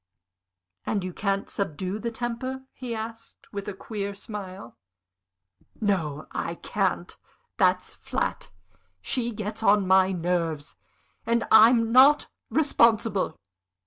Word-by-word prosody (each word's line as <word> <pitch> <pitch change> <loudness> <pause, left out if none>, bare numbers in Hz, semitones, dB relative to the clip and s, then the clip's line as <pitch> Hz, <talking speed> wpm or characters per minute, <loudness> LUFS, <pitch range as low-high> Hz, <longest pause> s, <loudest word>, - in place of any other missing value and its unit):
"And 200 -3 -1
you 185 -1 -5
can't 195 0 -1
subdue 190 +2 -3
the 235 - -2
temper?" 240 +3 -4
he 245 -3 -5
asked, 225 +1 -8
with 200 0 -5
a 205 - -3
queer 200 -1 -5
smile. 195 - -8 1.0
"No, 165 -9 -1
I - - -3
can't! - - -2 0.4
That's - - +2
flat. - - -3 0.5
She 240 - -1
gets 215 0 -5
on 205 -2 +4
my 190 0 +4
nerves, 170 -4 -2 0.5
and 230 +1 +1
I'm 225 +1 +7
not 270 +4 +6 0.2
responsible. 225 - +2
210 Hz, 110 wpm, -26 LUFS, 190-230 Hz, 1.0 s, I'm